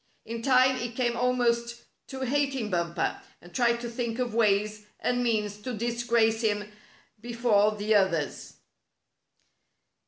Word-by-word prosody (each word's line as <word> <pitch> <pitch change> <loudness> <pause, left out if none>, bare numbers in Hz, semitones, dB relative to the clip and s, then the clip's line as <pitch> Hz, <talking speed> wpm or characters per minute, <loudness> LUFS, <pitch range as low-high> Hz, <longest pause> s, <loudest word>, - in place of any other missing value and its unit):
In 230 0 -5
time 255 +1 +4
he 245 -1 -3
came 240 0 -1
almost 235 -1 0 0.2
to 265 -1 -7
hating 265 -4 0
Bumper, 170 -1 -1 0.2
and 175 0 -16
tried 235 -1 +2
to 240 - -4
think 235 -1 -3
of 245 -3 -2
ways 210 -1 +1
and 245 0 0
means 210 -4 0
to 250 +2 -4
disgrace 235 0 +1
him 205 -2 0 0.6
before 225 -3 +2
the 210 +1 0
others. 180 -8 0
235 Hz, 130 wpm, -27 LUFS, 210-245 Hz, 0.6 s, time